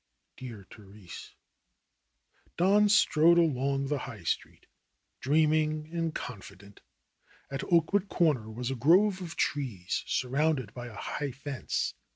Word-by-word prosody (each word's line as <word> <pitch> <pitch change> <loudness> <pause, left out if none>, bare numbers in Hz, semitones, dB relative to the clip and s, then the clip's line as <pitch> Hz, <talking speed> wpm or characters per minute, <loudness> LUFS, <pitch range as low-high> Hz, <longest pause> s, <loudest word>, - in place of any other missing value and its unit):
Dear 115 -6 -9
Therese! 100 -3 -12 1.2
Don 205 +4 +4
strode 170 -4 +5
along 140 -4 +1
the 145 +1 -1
High 115 -8 -8
Street, - - -3 0.5
dreaming 155 +1 +1
and 165 -2 -2
con 125 -6 -6
fident. 100 +1 -14 0.7
At 135 - -3
Oakwood 180 +4 +2
Corner 145 -11 +1
was 120 +3 -4
a - - -2
grove 185 - +4
of 170 -3 -7
trees, 115 -11 -2
sur 125 - -1
rounded 135 -5 0
by 120 -1 -7
a 115 - -11
high 145 +6 -4
fence. 135 0 -3
140 Hz, 130 wpm, -29 LUFS, 120-160 Hz, 1.2 s, strode